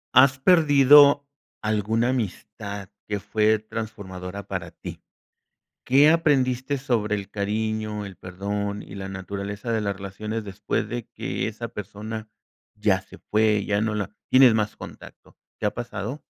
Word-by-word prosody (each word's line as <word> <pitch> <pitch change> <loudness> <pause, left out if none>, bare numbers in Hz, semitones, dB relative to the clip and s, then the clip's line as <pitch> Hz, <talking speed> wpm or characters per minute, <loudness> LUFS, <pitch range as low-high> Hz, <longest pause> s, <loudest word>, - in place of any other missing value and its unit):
¿Has 130 +1 +7
perdido 145 -3 +6 0.4
alguna 110 +2 +1
amistad 100 -4 -4 0.2
que 105 -1 -2
fue 110 +2 +2
transformadora 100 -3 -7
para 90 -3 -4
ti? - - -9 0.8
¿Qué 140 +4 +6
aprendiste 140 -4 +2
sobre 115 -6 0
el 100 -1 -4
cariño, 105 0 -2
el 95 -2 -10
perdón 100 +2 -4
y - - -11
la 95 -1 -6
naturaleza 100 +4 -5
de 110 -1 +1
las 100 -2 -2
relaciones 105 +3 -5
después 100 +1 -3
de 120 -2 -4
que - - -3
esa 115 +2 -5
persona 110 +2 -7 0.4
ya 105 -3 +1
se - - -15
fue, 105 -1 +1
ya 105 0 +1
no 110 -1 0
la 105 0 -4
tienes 130 -3 +7
más 105 -1 0
contacto? - - -12 0.2
¿Te 110 - -1
ha 105 - -1
pasado? 120 +3 -5
105 Hz, 145 wpm, -24 LUFS, 100-120 Hz, 0.8 s, Has